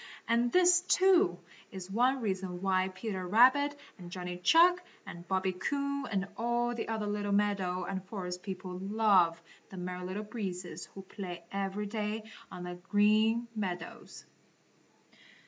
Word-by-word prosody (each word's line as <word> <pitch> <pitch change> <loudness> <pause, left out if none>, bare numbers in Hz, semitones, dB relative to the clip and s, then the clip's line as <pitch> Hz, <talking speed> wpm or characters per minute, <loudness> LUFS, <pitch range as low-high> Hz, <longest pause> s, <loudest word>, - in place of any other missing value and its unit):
And 235 +1 +2
this, 360 -1 +5
too, 365 - +4 0.3
is 190 0 -8
one 250 +5 +2
reason 190 -4 -3
why 190 -1 +2
Peter 190 -1 -5
Rabbit 260 +8 +5 0.2
and 175 -1 -9
Johnny 180 0 -5
Chuck 345 - +5 0.2
and 170 0 -10
Bobby 190 0 +1
Coon 280 +8 -2
and 195 -2 -1
all 240 +1 0
the 235 - -4
other 220 -1 -2
little 205 0 -2
meadow 200 -3 +1
and 190 +1 -4
forest 180 -3 -5
people 185 -2 -6
love 195 -4 +3 0.3
the 190 - -10
Merry 180 0 -5
Little 190 +4 -4
Breezes 185 -6 -5
who 195 - -8
play 180 -3 -7
every 195 +1 -2
day 215 +1 -3 0.3
on 180 - -7
the 180 0 -6
Green 215 +3 +3
Meadows. 180 -5 -5
200 Hz, 145 wpm, -31 LUFS, 180-225 Hz, 0.3 s, this